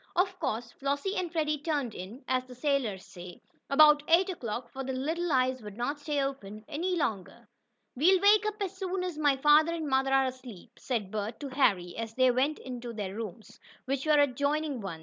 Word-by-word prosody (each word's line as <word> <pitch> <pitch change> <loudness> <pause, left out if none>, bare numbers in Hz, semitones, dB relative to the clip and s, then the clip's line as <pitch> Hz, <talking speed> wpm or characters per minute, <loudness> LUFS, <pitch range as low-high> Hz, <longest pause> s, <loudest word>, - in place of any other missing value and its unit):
Of 370 +1 +1
course 235 -6 -3
Flossie 285 +8 -2
and 355 -3 -2
Freddie 305 -3 0
"turned 290 -6 -2
in," 205 +9 -9
as 255 0 0
sailors 250 -9 -1
say, 175 0 -11 0.3
about 300 +1 +7
eight 355 +4 +4
o'clock, 240 -7 -5
for 270 - -5
their 265 0 -3
little 325 +6 -2
eyes 255 -1 +1
would 210 -1 -10
not 285 +5 -2
stay 290 -1 -1
open 215 -6 -6
any 360 +5 -2
longer. 220 - -3 0.5
"We'll 360 +8 +4
wake 420 +2 +5
up 425 0 -4
as 390 -1 -2
soon 375 -1 -3
as 355 -4 -4
my 290 -3 +3
father 300 +4 +5
and 320 -2 -4
mother 270 0 +1
are 270 0 +4
asleep," 255 -7 -8
said 220 -7 -3
Bert 215 +1 -4
to 285 - -5
Harry, 195 -10 +1
as 225 0 -5
they 255 -1 +4
went 270 +5 0 0.2
to 240 -1 -6
their 205 -3 -4
rooms, 220 0 -8 0.3
which 270 +2 -2
were 305 -1 +5
adjoining 285 0 0
ones. 180 -5 -6
270 Hz, 195 wpm, -29 LUFS, 230-310 Hz, 0.5 s, about